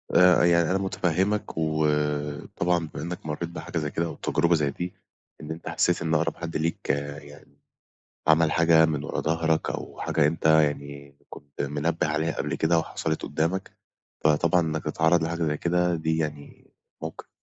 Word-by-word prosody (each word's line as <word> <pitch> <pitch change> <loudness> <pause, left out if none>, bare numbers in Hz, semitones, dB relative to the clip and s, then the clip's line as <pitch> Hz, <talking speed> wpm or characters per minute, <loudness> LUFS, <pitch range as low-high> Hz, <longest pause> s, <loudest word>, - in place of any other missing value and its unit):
آآ، 90 0 +6
يعني، 85 -1 +4
أنا 95 - +2
متفهِّمك، 95 +1 -1
وطبعًا 75 +2 0
بما - - -5
إنك 85 0 -6
مرَّيت 80 +2 -3
بحاجة 85 0 -6
زي 75 -2 -2
كده، 85 - -1
أو 85 - -5
تجربة 85 0 +1
زي 75 -3 +1
دي، 90 +5 -5 0.5
إن 75 - -7
أنت 80 +1 -6
حسِّيت 90 -1 +1
إن 80 -1 -1
أقرب 80 0 +1
حد 85 -1 -4
ليك 80 +1 -3
يعني، 70 0 -5 0.7
عمل 80 0 +4
حاجة 80 0 +5
من 75 -2 -2
ورا - - -3
ضهرك، 80 0 0
أو - - -6
حاجة 75 - +2
أنت 80 +1 -4
يعني 70 -2 +1
كُنت 70 -1 -8
منبِّه 75 +3 -1
عليها 75 +2 0
قبل 70 0 -2
كده 80 +3 +2
وحصلت 80 0 -3
قُدَّامك، 85 +6 -1 0.5
فطبعًا 80 +3 +4
إنك 80 -1 -2
تتعرَّض 80 +2 +2
لحاجة 85 +1 -2
زي 75 -2 0
كده 90 +1 +1
دي 80 0 -1
يعني 75 -2 -5 0.3
موقف، 80 - -6
آآ، - - -46
80 Hz, 170 wpm, -26 LUFS, 75-85 Hz, 0.7 s, آآ